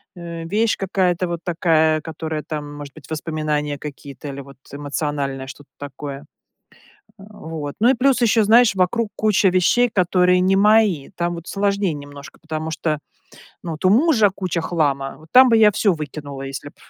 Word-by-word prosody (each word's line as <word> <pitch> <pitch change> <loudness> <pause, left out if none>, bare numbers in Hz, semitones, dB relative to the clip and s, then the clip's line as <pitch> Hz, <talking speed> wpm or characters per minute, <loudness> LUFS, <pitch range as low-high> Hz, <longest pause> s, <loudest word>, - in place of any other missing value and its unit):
э, 170 -2 -7
вещь 215 +6 +1
какая-то 185 -2 0
вот 170 -1 -4
такая, 160 -2 +2
которая 160 -1 -5
там, 145 -1 -5
может 145 -1 -9
быть, 155 - -15
воспоминания 155 -2 -2
какие-то 140 -1 -9
или 140 0 -7
вот 140 0 -14 0.2
эмоциональное 140 -2 -3
что-то 140 +1 -12
такое. 145 0 -8 0.9
Э, - - -14
вот. 160 -7 -7
Ну 230 - +5
и - - +4
плюс 260 0 +2
еще, 225 -1 +3
знаешь, 230 +1 +5
вокруг 195 +5 +1
куча 215 -1 +3
вещей, 210 +7 +3
которые 180 -1 +3
не 185 +1 +2
мои, 210 -7 +3
там 175 0 -1
вот 170 0 -9
сложнее 200 -3 0
немножко, 145 -1 -11
потому 155 0 -5
что, 155 -1 -2 0.7
ну, 170 - -4
от 155 - -6
у - - +6
мужа 230 - +4
куча 185 -3 -3
хлама, 140 -5 -1
вот 155 +1 -18
там 255 +1 +8
бы 230 - +4
я 215 -1 +6
всё 200 -1 +2
выкинула, 145 -3 -7
если 135 +1 -7
б - - -22
165 Hz, 175 wpm, -20 LUFS, 145-195 Hz, 0.9 s, там